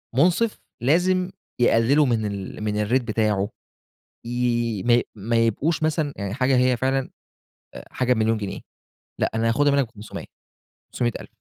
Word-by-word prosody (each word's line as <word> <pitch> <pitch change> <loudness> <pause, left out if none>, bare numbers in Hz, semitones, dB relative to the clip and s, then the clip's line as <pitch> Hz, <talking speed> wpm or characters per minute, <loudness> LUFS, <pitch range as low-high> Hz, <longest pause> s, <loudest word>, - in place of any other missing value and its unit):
مُنصِف، 180 - +2 0.2
لازم 180 +6 +2 0.3
يقللوا 120 +5 +4
من 115 -4 0
ال 100 +1 -5
من 105 0 -1
الrate 130 +1 +3
بتاعه، 105 -2 0 0.8
ي 120 -3 0
ما 120 - +2
ي 120 - +3
ما 115 +3 -1
يبقوش 115 +9 +1
مثلًا 155 -2 0
يعني 100 0 -4
حاجة 130 0 +2
هي 125 0 +3
فعلًا 135 +1 0 0.6
آآ - - -9
حاجة 125 -1 +1
ب - - +2
1,000,000 110 0 +2
جنيه، 100 -2 -5 0.6
لأ - - +1
أنا 115 +1 +1
هاخدها 145 +4 +3
مِنّك 140 -3 +2
ب500 110 -2 -9 0.7
500,000. 120 -2 -2
120 Hz, 155 wpm, -23 LUFS, 110-140 Hz, 0.8 s, يقللوا